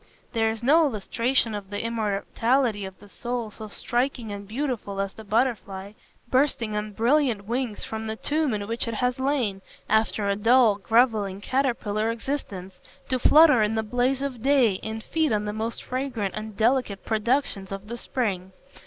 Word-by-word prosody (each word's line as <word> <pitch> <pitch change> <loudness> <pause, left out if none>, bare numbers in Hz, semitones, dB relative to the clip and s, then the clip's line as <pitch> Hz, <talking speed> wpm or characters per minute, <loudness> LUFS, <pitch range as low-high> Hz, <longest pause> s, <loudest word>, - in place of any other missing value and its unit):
There 225 -2 +2
is 225 +1 -5
no 310 +6 +5
illustration 230 +1 0
of 205 -2 -6
the 205 +1 -3
immortality 225 +1 0
of 190 0 -9
the 205 - -15
soul 235 +1 -4
so 215 +1 -8
striking 240 +1 -2
and 200 0 -7
beautiful 230 -4 -3
as 195 0 -2
the 220 - -11
butterfly, 205 -3 -1 0.3
bursting 250 -4 +1
on 210 0 -3
brilliant 235 -2 +2
wings 235 -1 -2
from 220 0 -5
the 220 - -2
tomb 300 +4 0
in 205 -1 -3
which 230 +2 -2
it 230 - -2
has 250 +3 0
lain, 255 -8 0 0.3
after 220 -1 +1
a 200 - +2
dull, 225 0 +4
grovelling, 215 -3 +2
caterpillar 225 -3 0
existence, 210 -7 -4 0.3
to 255 - 0
flutter 295 -2 +7
in 215 +1 +1
the 220 - 0
blaze 250 +4 0
of 260 -5 -4
day 255 -7 +3
and 220 0 -5
feed 315 -4 0
on 210 -1 0
the 210 - -3
most 220 +2 -3
fragrant 250 -6 -3
and 215 -1 -6
delicate 230 -3 +1
productions 220 -3 0
of 195 +1 -6
the 235 - -5
spring. 190 -8 -2
225 Hz, 170 wpm, -25 LUFS, 205-255 Hz, 0.3 s, flutter